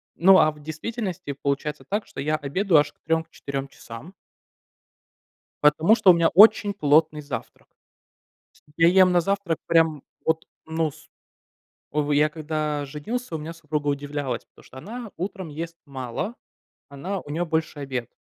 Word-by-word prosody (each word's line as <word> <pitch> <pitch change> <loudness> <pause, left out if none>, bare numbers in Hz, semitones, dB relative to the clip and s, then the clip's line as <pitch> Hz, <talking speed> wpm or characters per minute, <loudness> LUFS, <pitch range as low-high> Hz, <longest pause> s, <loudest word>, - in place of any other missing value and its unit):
Ну, 190 +2 +7
а 155 - +4
в 150 0 -16
действительности 180 0 -5
получается 140 0 -3
так, 205 +2 -2
что - - -10
я 155 +2 0
обедаю 155 +4 +2
аж - - -4
к - - -46
3, 160 0 +1
к - - -34
4 140 0 -5
часам. 120 +9 -11 1.5
Потому 155 +8 +5
что 205 -5 +6
у - - +6
меня 165 -1 +3
очень 205 +1 +6
плотный 155 -2 +3
завтрак. 130 -6 -7 1.1
Я 165 - +7
ем 185 0 +6
на 175 -1 +4
завтрак 195 -3 -1
прям 160 -3 +2 0.2
вот, 160 0 0 0.2
ну, 160 -1 -1
с 155 - -18 0.8
о, 150 0 0
я 150 +1 +4
когда 150 -1 -3
женился, 165 - -5
у - - -2
меня 160 +2 -6
супруга 150 -3 -3
удивлялась, 140 -3 -3
потому - - -22
что 130 - -16
она 225 - -8
утром 185 0 -5
ест 165 +3 -6
мало, 135 - -5 0.5
она 175 +8 -5
у 145 - -12
нее 170 +4 -1
больше 160 -2 -2
обед 130 -4 -4
155 Hz, 160 wpm, -24 LUFS, 145-180 Hz, 1.5 s, Ну